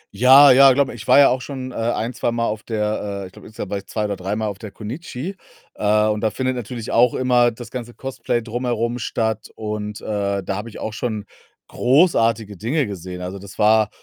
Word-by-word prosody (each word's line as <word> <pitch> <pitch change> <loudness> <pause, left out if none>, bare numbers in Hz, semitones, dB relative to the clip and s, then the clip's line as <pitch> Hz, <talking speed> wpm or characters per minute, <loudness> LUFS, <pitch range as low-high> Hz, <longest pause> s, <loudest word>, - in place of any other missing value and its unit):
Ja, 135 +3 +8
ja, 135 +1 +8
glaube 140 0 +1
mir, - - -9
ich 110 - -10
war - - +6
ja 140 - +8
auch 125 +1 0
schon, 130 -1 -6
äh, - - -11
ein 115 +1 -1
zweimal 120 -1 -1
auf 105 0 -2
der, 105 -2 -3
äh - - -6
ich 90 - -11
glaube - - -14
insgesamt 105 -3 -7
war 100 - -1
ich 100 - -16
2 105 -1 -2
oder 100 -1 -2
dreimal 105 +4 -3
auf 100 -1 -5
der 110 - -8
Connichi. 130 - -7 0.4
Äh, 105 0 +2
und 105 -1 0
da 110 - +2
findet 130 +4 -2
natürlich 120 -1 -6
auch 120 +1 +4
immer 125 -1 +3
das 115 -1 -10
ganze 120 -2 -7
Cosplay 130 -3 -3
drumherum 120 0 -2
statt 110 -2 -2
und, 105 -1 -5
äh, 100 -2 -2
da 100 - -3
habe 105 +4 -5
ich 105 - -11
auch 110 - -4
schon 110 -2 -3 0.4
großartige 115 - +2
Dinge 130 - 0
gesehen, 90 -3 -7
also 95 +2 -6
das 95 0 -12
war 110 0 +4
110 Hz, 220 wpm, -21 LUFS, 105-125 Hz, 0.4 s, Ja